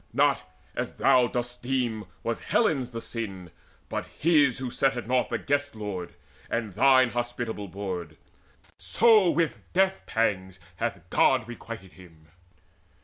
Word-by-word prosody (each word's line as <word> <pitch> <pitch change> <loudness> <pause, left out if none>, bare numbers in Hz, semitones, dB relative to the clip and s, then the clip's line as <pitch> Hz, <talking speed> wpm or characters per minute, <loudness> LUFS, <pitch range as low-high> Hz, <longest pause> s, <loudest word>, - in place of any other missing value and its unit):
Not, - - +2 0.3
as - - -3
thou 125 -1 +4
dost 120 0 -4
deem, 120 -4 -1 0.2
Was 115 0 -2
Helen's 135 - +1
the 115 -2 -5
sin, 95 -8 -5 0.4
but - - -4
his 150 -6 +4
who 130 -1 -4
set 135 0 +1
at 120 - -4
naught 125 0 +1
The - - 0
Guest 145 -2 -1
lord, 100 -5 -5 0.3
and 115 -4 -2
thine 130 +2 +5
hospitable 120 -3 -3
board; 90 -5 -5 0.6
So 220 -5 +5
with 165 0 0
death 190 +1 +2
pangs 95 -4 -1 0.2
hath - - -3
God 130 -4 +3
requited 115 -5 -8
him." 80 -2 -17
120 Hz, 140 wpm, -27 LUFS, 100-135 Hz, 0.6 s, thine